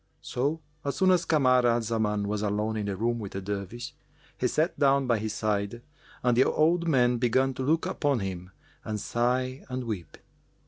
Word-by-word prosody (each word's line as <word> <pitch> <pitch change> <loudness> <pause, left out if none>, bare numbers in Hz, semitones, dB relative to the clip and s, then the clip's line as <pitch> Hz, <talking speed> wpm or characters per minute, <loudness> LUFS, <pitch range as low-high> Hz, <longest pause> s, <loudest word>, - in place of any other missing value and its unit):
So, 145 +6 -1 0.2
as 140 - -2
soon 185 0 +4
as 180 -2 +3
Kamar 130 -5 +4
al 120 0 +3
Zaman 105 -2 -1
was 105 0 -2
alone 105 +1 -1
in 105 -1 -2
the 100 - -2
room 120 +3 0
with 100 -3 -7
the 95 - -3
Dervish, 100 +4 -5 0.4
he 125 - 0
sat 155 +7 0
down 140 -1 +4
by 120 -3 +2
his 110 0 -3
side 105 +2 -2 0.4
and 125 -1 +3
the 125 - +6
old 170 +2 +2
man 125 -5 +3
began 130 +2 +2
to 130 - -6
look 160 +5 +2
upon 145 -5 0
him 90 -2 -5 0.3
and 105 -1 -3
sigh 125 +4 -1
and 130 0 -3
weep. 105 -8 -5
120 Hz, 190 wpm, -28 LUFS, 105-135 Hz, 0.4 s, the